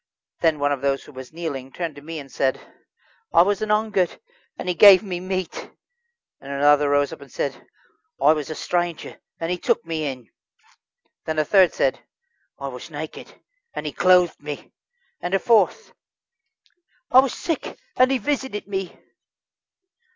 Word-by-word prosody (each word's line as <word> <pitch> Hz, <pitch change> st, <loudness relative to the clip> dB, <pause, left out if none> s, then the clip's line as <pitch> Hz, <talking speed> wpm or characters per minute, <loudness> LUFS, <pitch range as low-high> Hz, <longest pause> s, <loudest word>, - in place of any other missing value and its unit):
Then 160 Hz, -2 st, +2 dB
one 145 Hz, 0 st, +1 dB
of 140 Hz, -2 st, -2 dB
those 140 Hz, 0 st, 0 dB
who -, -, -14 dB
was 130 Hz, -2 st, -10 dB
kneeling 150 Hz, -6 st, -5 dB
turned 170 Hz, 0 st, -4 dB
to 145 Hz, -, -11 dB
me 160 Hz, +2 st, -7 dB
and 140 Hz, -3 st, -9 dB
said: 135 Hz, 0 st, 0 dB, 0.7 s
"I 170 Hz, -, +7 dB
was 200 Hz, +2 st, 0 dB
an 215 Hz, -, -2 dB
hungred, 210 Hz, -4 st, +1 dB, 0.4 s
and -, -, -6 dB
he 180 Hz, -, +1 dB
gave 195 Hz, +2 st, +8 dB
me 185 Hz, -4 st, -4 dB
meat." 185 Hz, -1 st, -4 dB, 0.7 s
And 140 Hz, -, -9 dB
another 145 Hz, +1 st, +4 dB
rose 145 Hz, 0 st, +2 dB
up -, -, -11 dB
and -, -, -14 dB
said: -, -, -4 dB, 0.5 s
"I 150 Hz, +2 st, +6 dB
was 150 Hz, -2 st, -4 dB
a 155 Hz, -, -4 dB
stranger, 175 Hz, -1 st, -3 dB, 0.2 s
and 165 Hz, +1 st, -2 dB
he 180 Hz, -, -2 dB
took -, -, 0 dB
me 160 Hz, -2 st, -2 dB
in." 125 Hz, -4 st, -6 dB, 1.0 s
Then 160 Hz, -1 st, -3 dB
a 155 Hz, -, +2 dB
third 190 Hz, +2 st, +4 dB
said: -, -, +1 dB, 0.6 s
"I 140 Hz, 0 st, -5 dB
was 125 Hz, +3 st, -9 dB
naked, 155 Hz, 0 st, -8 dB, 0.4 s
and -, -, -5 dB
he 150 Hz, -, -2 dB
clothed 180 Hz, 0 st, +3 dB
me." 145 Hz, 0 st, -7 dB, 0.5 s
And 180 Hz, +2 st, -1 dB
a -, -, +2 dB
fourth: 230 Hz, -, +2 dB, 1.2 s
"I 255 Hz, -, +8 dB
was 265 Hz, -1 st, +2 dB
sick, 330 Hz, -2 st, -4 dB, 0.2 s
and 255 Hz, +1 st, +5 dB
he 270 Hz, -, +3 dB
visited 265 Hz, -4 st, -3 dB
me." 190 Hz, -3 st, -4 dB
170 Hz, 170 wpm, -23 LUFS, 145-195 Hz, 1.2 s, gave